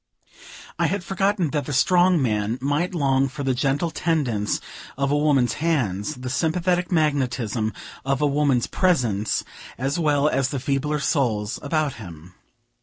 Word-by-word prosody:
I - - +3
had 195 -1 -2
forgotten 195 -3 0
that 145 -3 -1
the 145 - -3
strong 180 +5 +4
man 110 -3 0
might 145 +7 -1
long 135 -3 +2
for 140 +2 -6
the 135 -1 +1
gentle 140 +5 0
tendance 130 -14 0 0.4
of 140 0 0
a - - +3
woman's 140 -5 +2
hands, 135 - 0
the 125 0 -7
sympathetic 175 +5 0
magnetism 130 - 0 0.3
of 135 0 0
a 150 - +2
woman's 140 -4 +2
presence, 120 - +1 0.3
as 135 +6 -1
well 150 -2 +2
as 135 -2 +1
the 140 - -3
feebler 140 +3 -1
souls 115 -8 0
about 150 -1 0
him. 85 -2 -11
140 Hz, 150 wpm, -23 LUFS, 125-155 Hz, 0.4 s, strong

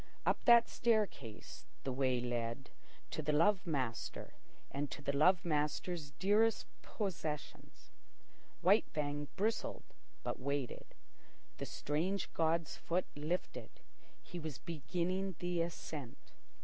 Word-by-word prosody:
Up - - +2
that 235 -1 +8
staircase 210 - -1 0.2
the 135 - -1
way 130 -1 +2
led 120 +1 -2 0.4
to - - -2
the 150 - +1
love 185 +5 +4
master 130 -8 -2 0.4
and 140 0 -2
to - - -6
the 140 - 0
love 180 +6 +5
master's 150 +1 0
dearest 205 +9 +3 0.2
possessions. 160 - -5 0.7
White 195 +5 +5
Fang 145 -1 -2
bristled, 220 +3 0 0.4
but - - -2
waited. 140 -1 -3 0.6
The - - -3
strange 175 +7 -1
god's 165 0 +1
foot 180 +2 0
lifted. 155 +5 -2 0.5
He 175 - -6
was 155 -3 -5
beginning 180 +3 -2
the 175 -1 0
ascent. 155 -6 -5
160 Hz, 115 wpm, -36 LUFS, 140-185 Hz, 0.7 s, that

